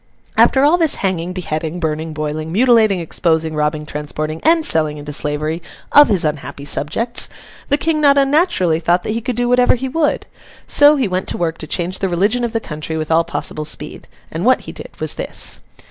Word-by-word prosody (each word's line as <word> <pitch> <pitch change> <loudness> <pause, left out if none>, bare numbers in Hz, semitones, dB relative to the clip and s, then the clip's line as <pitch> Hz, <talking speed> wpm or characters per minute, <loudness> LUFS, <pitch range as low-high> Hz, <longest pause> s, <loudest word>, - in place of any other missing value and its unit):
After 265 - +4
all 320 +5 +4
this 325 -4 +2
hanging, 180 -2 -1
beheading, 165 -2 -4
burning, 160 0 -3
boiling, 155 +1 -4
mutilating, 220 -2 +3
exposing, 160 -1 -1
robbing, 150 0 -1
transporting, 155 +1 -5
and 325 -1 +4
selling 155 -2 +2
into 145 0 -7
slavery, 150 +3 -2 0.3
of 290 0 +8
his 195 -7 +1
unhappy 140 -2 -4
subjects, 175 - +1 0.4
the 285 - +3
King 315 0 0
not 285 -1 +5
unnaturally 275 - +2
thought 175 +2 +1
that - - -3
he 230 +2 -2
could 250 +1 -3
do 245 +1 0
whatever 250 0 +4
he 260 +2 -4
would. 300 +2 0 0.4
So, 290 +1 +6
he 265 -6 0
went 185 0 -2
to - - -2
work 165 -1 -2
to 155 - -6
change 180 +3 -1
the 190 - -1
religion 205 +8 +1
of 235 - -1
the 225 - 0
country 155 -4 -6
with 155 0 -4
all 165 +1 +4
possible 155 - -4
speed; 150 0 -4 0.2
and 165 +2 -4
what 255 +3 +3
he - - -8
did - - -9
was - - -1
this. - - -2
175 Hz, 200 wpm, -17 LUFS, 155-245 Hz, 0.4 s, of